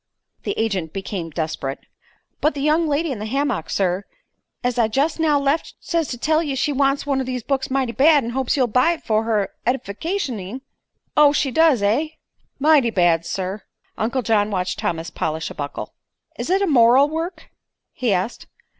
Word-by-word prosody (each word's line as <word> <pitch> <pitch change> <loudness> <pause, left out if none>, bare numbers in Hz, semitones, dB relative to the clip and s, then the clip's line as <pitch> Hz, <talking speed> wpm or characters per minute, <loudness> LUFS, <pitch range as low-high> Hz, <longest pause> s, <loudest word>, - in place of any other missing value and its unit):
The - - -1
agent 195 -8 -1
became 190 -3 -4
desperate. 155 -4 -3 0.6
"But 305 +1 +1
the 280 - -3
young 310 +3 +2
lady 300 +2 0
in 240 - -4
the 215 - -4
hammick, 260 - -1
sir, 190 0 0 0.6
as 245 0 0
I 225 - +4
jest 280 +9 0
now 305 -3 +3
left, 280 +3 -1
says 335 -3 -1
to 245 - -5
tell 310 +6 +2
ye 290 -5 -2
she 290 +2 0
wants 275 +1 +1
one 275 -2 0
o' - - -1
these 255 -2 -4
books 275 +1 -1
mighty 265 -2 0
bad, 290 +3 +5
an' 235 - -4
hopes 265 +2 0
you'll 260 - +4
buy 250 +8 +3
it 330 - -10
for 220 0 +1
her 215 -3 0
eddificationing." 250 - -3 0.5
"Oh; 295 -1 +6
she 285 -2 +1
does, 305 -6 +4
eh?" 230 +10 +2 0.5
"Mighty 285 -4 +4
bad, 175 -5 +2
sir." 190 +2 -3 0.3
Uncle 245 +4 -1
John 210 -2 +2
watched 185 -2 -2
Thomas 165 0 -2
polish 160 +1 -3
a - - -6
buckle. 145 -1 -6 0.4
"Is - - -5
it 385 +2 +3
a - - +3
moral 260 -3 +5
work?" 325 +4 -5 0.4
he 250 -4 -1
asked. 190 +4 -2
255 Hz, 185 wpm, -21 LUFS, 205-290 Hz, 0.6 s, Oh